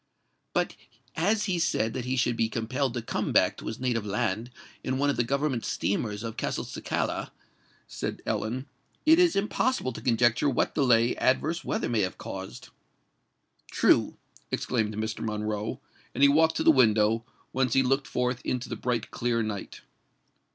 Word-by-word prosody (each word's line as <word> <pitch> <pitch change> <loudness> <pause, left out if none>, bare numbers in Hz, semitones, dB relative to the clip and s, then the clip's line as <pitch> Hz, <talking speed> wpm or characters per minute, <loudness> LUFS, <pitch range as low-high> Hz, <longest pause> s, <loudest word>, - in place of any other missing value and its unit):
"But - - 0 0.4
as 205 +6 +1
he 185 -4 0
said 115 -9 +1
that 125 - -4
he 130 +1 -1
should 120 -1 +2
be 115 -1 +1
compelled 125 +3 -1
to 120 - -3
come - - -2
back - - +4
to - - -8
his 110 - -4
native 120 -4 0
land 110 +2 -1 0.3
in 130 0 -1
one 145 +1 +2
of - - -3
the 120 - +2
government 135 -1 -1
steamers 105 +1 -2
of 115 -1 -5
Castelcicala," - - -2 0.6
said - - -5
Ellen, 125 +5 -2 0.4
"it 320 +2 +7
is 355 -2 +4
impossible 210 - 0
to - - -8
conjecture 120 +3 +3
what 130 - 0
delay 120 -5 +3
adverse 155 +6 +1
weather - - -1
may 115 -3 +1
have 90 -1 -2
caused." - - -7 1.0
"True," - - +3 0.3
exclaimed 110 -3 -1
Mr. 110 0 -3
Monroe; 105 0 -3 0.4
and 140 - +2
he 140 - +8
walked 160 +3 +4
to - - 0
the - - +7
window, 115 -4 +3 0.3
whence 130 -2 +1
he 135 - +4
looked 135 +2 +1
forth 125 0 -1
into 125 -1 -2
the - - -3
bright 120 -3 -2
clear 115 -1 0
night. 105 -2 -5
120 Hz, 165 wpm, -28 LUFS, 110-135 Hz, 1.0 s, he